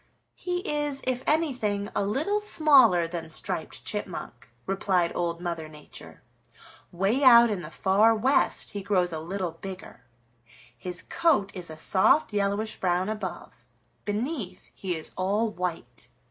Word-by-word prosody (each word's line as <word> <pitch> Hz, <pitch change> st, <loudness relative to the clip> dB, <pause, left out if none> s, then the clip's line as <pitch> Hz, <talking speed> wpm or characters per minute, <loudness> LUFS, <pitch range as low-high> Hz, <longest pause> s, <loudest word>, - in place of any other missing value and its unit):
"He 355 Hz, 0 st, -4 dB
is, 295 Hz, -2 st, -1 dB
if 255 Hz, 0 st, -1 dB
anything, 250 Hz, -11 st, 0 dB
a -, -, +1 dB
little 295 Hz, -, 0 dB
smaller 275 Hz, -, +5 dB
than 165 Hz, -1 st, -5 dB
Striped 160 Hz, -, -4 dB
Chipmunk," -, -, -5 dB, 0.2 s
replied 190 Hz, -3 st, +1 dB
Old 170 Hz, -1 st, -2 dB
Mother 170 Hz, -3 st, -4 dB
Nature. 150 Hz, -1 st, -12 dB, 0.7 s
"Way 195 Hz, +10 st, 0 dB
out 235 Hz, -3 st, +8 dB
in 195 Hz, -4 st, -2 dB
the 155 Hz, -, -8 dB
Far 205 Hz, +6 st, +3 dB
West 260 Hz, +6 st, +1 dB
he 205 Hz, -, -5 dB
grows 185 Hz, -3 st, +1 dB
a 160 Hz, -, -3 dB
little 180 Hz, +2 st, -3 dB
bigger. 185 Hz, -6 st, -10 dB, 0.7 s
His 180 Hz, -1 st, -4 dB
coat 280 Hz, -13 st, +1 dB
is 180 Hz, -3 st, -6 dB
a 155 Hz, -, -8 dB
soft 195 Hz, -, +3 dB
yellowish 205 Hz, +2 st, -1 dB
brown 185 Hz, +1 st, 0 dB
above; 215 Hz, 0 st, -6 dB, 0.4 s
beneath 220 Hz, -, -4 dB
he 185 Hz, -3 st, -3 dB
is 160 Hz, -, -5 dB
all 205 Hz, +4 st, 0 dB
white. 170 Hz, -, -5 dB
200 Hz, 140 wpm, -27 LUFS, 175-245 Hz, 0.7 s, out